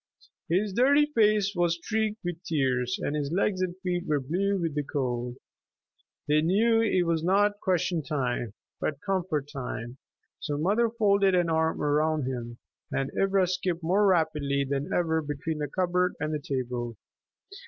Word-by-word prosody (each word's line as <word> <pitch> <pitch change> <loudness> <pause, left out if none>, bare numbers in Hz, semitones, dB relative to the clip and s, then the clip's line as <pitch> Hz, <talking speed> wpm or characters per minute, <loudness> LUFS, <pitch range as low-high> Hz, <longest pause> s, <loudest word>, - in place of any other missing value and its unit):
His 190 +4 +1
dirty 280 +6 +5
face 215 -7 +2
was 175 -1 +2
streaked 220 +4 -2
with 175 -1 -4
tears, 125 -5 0
and 145 - -1
his 145 -1 -2
legs 190 +1 +1
and 180 -1 -1
feet 180 -1 -2
were 150 -1 +2
blue 190 +9 0
with 165 -3 -2
the 150 - 0
cold. 125 -4 -3 0.9
They 150 +1 +3
knew 225 +7 +3
it 195 -5 +2
was 165 -1 0
not 205 +3 +2
question 180 -3 0
time, 125 -7 -2 0.2
but 145 -2 -2
comfort 180 -7 -1
time, 125 -2 -6 0.4
so 145 - -3
the 150 - -2
mother 220 +6 +2
folded 200 -4 +3
an 175 -2 +2
arm 160 0 +1
about 150 +1 +1
him, 120 -2 -5 0.3
and 135 0 -1
Ivra 195 -1 +3
skipped 180 -1 -2
more 195 +5 +3
rapidly 150 -6 +1
than 140 +1 -2
ever 160 -2 +1
between 150 +1 -4
the 150 - -2
cupboard 180 +3 0
and 155 +1 -2
the 150 - -1
table. 125 -4 -3
165 Hz, 165 wpm, -27 LUFS, 145-190 Hz, 0.9 s, dirty